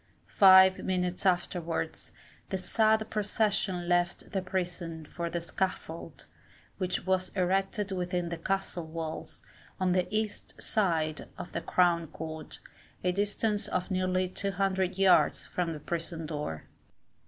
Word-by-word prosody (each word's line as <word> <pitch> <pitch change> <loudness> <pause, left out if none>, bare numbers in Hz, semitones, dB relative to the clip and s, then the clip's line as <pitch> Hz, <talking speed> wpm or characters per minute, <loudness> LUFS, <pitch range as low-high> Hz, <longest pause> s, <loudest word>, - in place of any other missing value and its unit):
Five 190 -1 +7
minutes 180 0 -1
afterwards, 175 -2 -1 0.4
the 190 - -1
sad 220 +3 +2
procession 205 -4 0
left 175 0 +1
the 195 -3 0
prison 175 -3 -3
for 170 +2 -4
the 170 - -2
scaffold, 170 -1 -4 0.5
which 185 -2 -1
was 185 -1 +1
erected 195 +2 0
within 180 -2 -1
the 170 - -3
castle 185 -1 -2
walls, 160 0 -6 0.4
on 185 -1 +2
the 180 0 +2
east 215 0 -3
side 165 -8 0
of - - -7
the - - -3
Crown 170 -2 +2
Court, 160 +1 -6 0.4
a 180 - +3
distance 205 +2 0
of 185 -1 -2
nearly 185 0 +1
200 190 -1 -1
yards 195 -1 +4
from 175 -2 -2
the 155 - -5
prison 165 +1 -4
door. 150 - -4
180 Hz, 130 wpm, -30 LUFS, 170-195 Hz, 0.5 s, Five